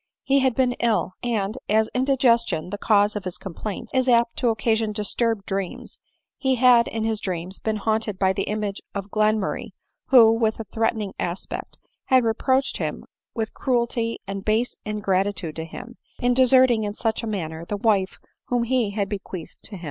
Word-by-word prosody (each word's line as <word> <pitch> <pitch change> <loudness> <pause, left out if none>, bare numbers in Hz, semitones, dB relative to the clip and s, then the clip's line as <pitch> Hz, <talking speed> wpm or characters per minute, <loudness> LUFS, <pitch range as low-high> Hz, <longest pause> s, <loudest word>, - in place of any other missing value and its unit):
He 275 +1 +3
had 260 -3 +2
been 255 -2 +2
ill; 220 -6 +1
and 225 -1 -1
as 220 +1 +3
indigestion, 235 - +2
the 205 - -4
cause 205 0 +3
of 210 - -3
his 185 -1 -4
complaints, 195 +2 -6
is 260 -1 +2
apt 235 -1 +3
to 245 - +2
oc 225 - 0
casion 220 0 +1
disturbed 215 0 -1
dreams, 195 -2 -4 0.4
he 265 -2 +2
had 245 -1 +5
in 225 -1 -3
his 220 -1 0
dreams 185 0 -4
been 220 -1 -1
haunted 215 -1 -1
by 190 0 +2
the 195 - -2
image 210 -1 -3
of 200 0 -5
Glenmurray, 215 -1 0 0.3
who, 235 -4 +7
with 225 -1 0
a - - -3
threat 225 +2 0
ening 210 -3 -4
aspect, 175 +1 -5 0.3
had 260 -1 +4
reproached 260 +4 +1
him - - -4 0.3
with 225 -2 -3
cruelty 235 -2 0
and 195 0 -5
base 220 +4 +1
ingratitude 195 -5 -1
to 160 - -4
him, 240 +8 -10 0.2
in 245 0 +2
deserting 255 -2 +5
in 205 0 -3
such 225 0 -1
a 230 - -5
manner 165 -6 -4
the 205 +4 -4
wife 200 -3 +1 0.3
whom 245 -1 0
he 240 -2 +1
had 200 -1 -2
bequeathed 195 -4 -7
to - - -6
him. - - -8
220 Hz, 185 wpm, -24 LUFS, 200-235 Hz, 0.4 s, who